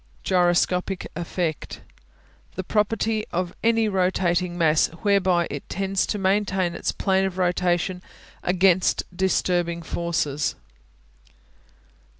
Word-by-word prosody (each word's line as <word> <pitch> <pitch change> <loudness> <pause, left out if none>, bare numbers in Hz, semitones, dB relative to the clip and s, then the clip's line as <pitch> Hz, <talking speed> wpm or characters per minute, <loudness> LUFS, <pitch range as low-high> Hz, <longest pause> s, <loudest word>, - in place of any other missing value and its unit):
Gyroscopic 180 +1 +1
Effect 170 -1 -3 0.7
The 185 - -3
property 215 +2 0
of 180 0 -2
any 225 -1 +3
rotating 180 -2 0
mass 160 -2 +3 0.2
whereby 190 -4 +3
it 145 - -7
tends 195 0 -1
to 210 - -2
maintain 190 -2 +1
its - - -2
plane 190 -1 +1
of 190 -1 -4
rotation 180 0 0 0.4
against 185 0 +2
disturbing 175 -2 0
forces. 160 -5 -1
180 Hz, 100 wpm, -24 LUFS, 175-195 Hz, 0.7 s, any